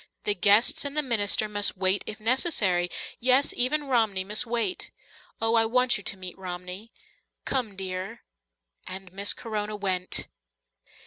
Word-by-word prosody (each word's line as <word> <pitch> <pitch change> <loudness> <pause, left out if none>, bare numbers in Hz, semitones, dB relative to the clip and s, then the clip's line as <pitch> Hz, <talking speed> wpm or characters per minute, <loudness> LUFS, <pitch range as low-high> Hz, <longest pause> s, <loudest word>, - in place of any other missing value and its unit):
The 210 - +2
guests 205 +4 +4
and 285 +1 -2
the 300 - +4
minister 215 -4 +2
must 205 -2 0
wait 190 +1 +2
if 210 - -5
necessary 215 - +2 0.3
yes, 255 +3 +3
even 295 +5 +2
Romney 225 -8 +1
must 210 +5 -2
wait. 240 +10 -2 0.5
Oh, 225 0 +1
I 225 -1 +3
want 250 +1 +3
you - - -4
to 195 - -3
meet 185 -2 -6
Romney. 180 +4 -7 0.5
Come, 240 -7 -1
dear." 185 0 -5 0.6
And 185 0 -7
Miss 200 +1 +1
Corona 215 -2 -4
went. 185 -3 -2
210 Hz, 145 wpm, -26 LUFS, 190-240 Hz, 0.6 s, guests